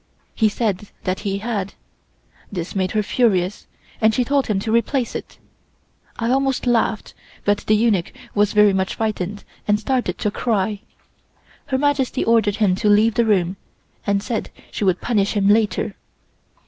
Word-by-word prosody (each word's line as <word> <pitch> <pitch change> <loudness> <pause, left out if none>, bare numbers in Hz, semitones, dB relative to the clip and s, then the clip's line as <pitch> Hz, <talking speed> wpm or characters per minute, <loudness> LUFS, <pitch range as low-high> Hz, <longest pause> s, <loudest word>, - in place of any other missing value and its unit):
He 220 -2 +3
said 210 -2 -2
that 185 0 -1
he 195 -2 -2
had. 200 -2 -3 0.8
This 180 -3 -4
made 185 -1 0
her 215 -1 +1
furious, 200 -5 +1 0.3
and 220 0 +4
she 250 - +2
told 275 +2 +1
him 210 -4 0
to 220 - -2
replace 235 +2 +1
it. - - -7 0.8
I 230 +1 0
almost 270 0 +1
laughed, 230 -3 0 0.3
but 205 0 +2
the 215 - +5
eunuch 210 -5 +1 0.2
was 205 0 +2
very 210 -1 +5
much 190 0 -1
frightened 205 -2 -3 0.2
and 210 0 +3
started 240 -6 -1
to 210 - -1
cry. 210 -2 -1 0.9
Her 265 - 0
Majesty 275 -2 +1
ordered 220 -3 +3
him 210 -4 +2
to 210 0 +1
leave 215 +2 +4
the 235 0 +2
room, 190 -3 +1 0.5
and 200 0 +1
said 230 -2 -3 0.2
she - - -3
would 185 -2 +2
punish 210 -4 +1
him 200 -2 +1
later. 210 -1 +2
210 Hz, 160 wpm, -21 LUFS, 200-230 Hz, 0.9 s, the